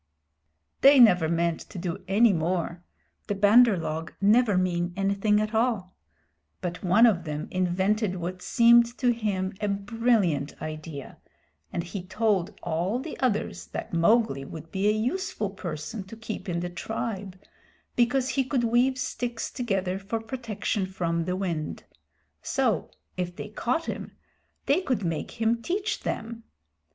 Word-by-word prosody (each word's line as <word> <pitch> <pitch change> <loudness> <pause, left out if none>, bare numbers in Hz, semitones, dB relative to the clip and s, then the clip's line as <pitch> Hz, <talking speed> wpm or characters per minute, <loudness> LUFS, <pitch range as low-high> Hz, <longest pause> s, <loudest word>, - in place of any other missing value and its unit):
They 275 0 +8
never 180 -9 +6
meant 170 0 +1
to - - -9
do 175 0 -4
any 210 +3 +5
more 170 +1 -1 0.4
the 205 - -1
Bandar 210 +2 +6
log 160 0 -4
never 210 0 +4
mean 175 -1 0
anything 200 +2 +2
at 215 +1 -2
all; 220 -5 0 0.6
but 180 +2 -5
one 195 +6 +6
of 190 -7 +3
them 150 -2 -4
invented 190 +3 +1
what 180 +1 -5
seemed 235 +1 +5
to 245 -2 +3
him 200 -5 -2
a 210 - 0
brilliant 200 - 0
idea, 155 -2 -7 0.5
and 170 - -2
he 180 +3 -5
told 205 -1 0
all 175 +6 -1
the 295 +5 -6
others 205 - -1
that 80 - -6
Mowgli 170 - +3
would 160 +3 -9
be 195 +1 0
a - - +5
useful 220 - -1
person 180 +2 -5
to 220 +4 -11
keep 215 -4 -6
in 170 -1 -1
the 175 - -3
tribe, 195 0 -4 0.6
because 250 +2 +2
he 270 - +1
could 255 -1 0
weave 245 +3 +3
sticks 240 -2 -3
together 195 -6 -1
for 210 +3 -3
protection 225 -4 -3
from 170 -3 -1
the 180 +1 -1
wind; 170 -5 -3 0.6
so, 240 - 0 0.3
if 175 -1 -3
they 210 - -7
caught 250 +9 -1
him, - - -5 0.5
they 295 +7 +3
could 255 - -1
make 165 +7 -4
him 230 +1 +1
teach 400 - -2
them. 230 0 -4
200 Hz, 150 wpm, -27 LUFS, 175-230 Hz, 0.6 s, They